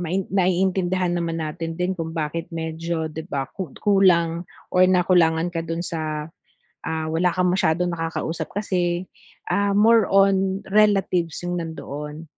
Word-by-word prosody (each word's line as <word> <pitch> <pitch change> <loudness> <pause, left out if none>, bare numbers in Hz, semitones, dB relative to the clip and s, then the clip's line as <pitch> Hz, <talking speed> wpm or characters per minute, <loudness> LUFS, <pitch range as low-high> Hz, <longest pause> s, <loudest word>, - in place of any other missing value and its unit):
mai 180 +2 -1
naiintindihan 185 -1 +1
naman 170 -1 -1
natin 165 +1 -5
din 180 +1 0
kung 165 -2 -5
bakit 160 +1 -3
medyo, 160 -1 -3
'di 160 +3 -7
ba, 140 -4 -2
ku 185 -5 -5
kulang 175 -4 +3 0.2
or 185 0 +5
nakulangan 175 -2 +3
ka 165 - -2
do'n 165 +1 -4
sa 155 -1 -4 0.5
ah, 160 -1 -2
wala 175 +2 +2
kang 180 -1 +2
masyadong 175 -1 +1
nakakausap 165 0 -3
kasi, 180 -3 0 0.5
ah, 200 +1 +1
more 225 0 +5
on 195 0 +3
relatives 195 -6 +2
yung 175 0 -2
nandoon. 150 -1 -7
175 Hz, 140 wpm, -23 LUFS, 165-185 Hz, 0.5 s, or